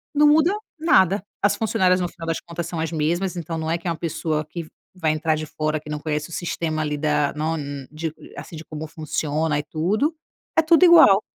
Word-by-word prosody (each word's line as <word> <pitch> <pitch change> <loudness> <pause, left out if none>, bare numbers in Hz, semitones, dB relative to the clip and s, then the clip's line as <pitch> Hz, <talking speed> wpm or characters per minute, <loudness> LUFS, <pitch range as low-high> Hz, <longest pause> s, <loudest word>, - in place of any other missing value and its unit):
não 295 +1 +6
muda 315 +4 +5 0.3
nada. 200 - +4 0.2
As 205 0 +2
funcionárias, 190 -4 +2
no 175 - 0
final 170 -1 -9
das 165 - -1
contas, 170 0 -5
são 165 - -5
as 160 0 -2
mesmas. 170 +4 0
Então 165 -1 -4
não 160 0 -3
é 165 - +1
que 170 +1 -8
é - - +1
uma 165 - -3
pessoa 160 -2 -2
que 165 +2 -7 0.3
vai 160 -4 +1
entrar 155 0 +1
de 155 0 -5
fora, 155 0 -2
que 150 - -12
não 150 - -2
conhece 150 0 -3
o - - -13
sistema 160 -2 -2
ali 150 -1 -2
da 150 -1 +1
não 160 +2 -1 0.3
de 155 0 -4 0.2
assim, 170 - -8
de 155 - -8
como 155 -1 -7
funciona 155 -1 -1
e 145 - -2
tudo. 200 - 0 0.4
É 320 - +6
tudo 330 +3 +5
igual. 315 - +8
165 Hz, 220 wpm, -23 LUFS, 155-185 Hz, 0.4 s, igual